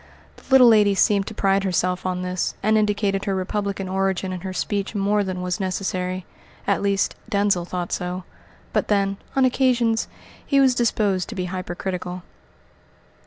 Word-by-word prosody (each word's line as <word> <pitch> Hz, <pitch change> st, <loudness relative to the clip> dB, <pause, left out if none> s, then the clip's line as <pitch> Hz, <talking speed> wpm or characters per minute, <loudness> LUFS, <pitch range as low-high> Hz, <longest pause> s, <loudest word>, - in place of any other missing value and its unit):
The -, -, -17 dB
little 265 Hz, -2 st, +8 dB
lady 210 Hz, -3 st, +5 dB
seemed 200 Hz, 0 st, +3 dB
to 220 Hz, -, -6 dB
pride 195 Hz, -1 st, +2 dB
herself 180 Hz, -1 st, 0 dB
on 180 Hz, 0 st, -2 dB
this, 180 Hz, -1 st, -2 dB
and 215 Hz, +2 st, +3 dB
indicated 205 Hz, -2 st, +1 dB
her 195 Hz, -, 0 dB
republican 195 Hz, +1 st, -2 dB
origin 190 Hz, 0 st, -1 dB
in 180 Hz, -, -5 dB
her 190 Hz, +1 st, -5 dB
speech 200 Hz, +2 st, -2 dB
more 205 Hz, +1 st, +2 dB
than 185 Hz, -2 st, -4 dB
was 180 Hz, 0 st, -2 dB
necessary 185 Hz, -1 st, -2 dB, 0.4 s
at 200 Hz, -, +1 dB
least, 200 Hz, -1 st, +1 dB, 0.2 s
Denzil 200 Hz, -4 st, +1 dB
thought 175 Hz, -1 st, -4 dB
so. 180 Hz, +1 st, -3 dB, 0.5 s
But -, -, +1 dB
then, 200 Hz, -1 st, +1 dB, 0.2 s
on 270 Hz, -1 st, +4 dB
occasions, 245 Hz, -3 st, +2 dB, 0.4 s
he 275 Hz, -, +2 dB
was 265 Hz, -2 st, +5 dB
disposed 210 Hz, -6 st, +1 dB
to 225 Hz, -, -6 dB
be 185 Hz, -2 st, -2 dB
hyper 180 Hz, -1 st, -5 dB
critical. 180 Hz, -1 st, -4 dB
195 Hz, 165 wpm, -23 LUFS, 185-210 Hz, 0.5 s, little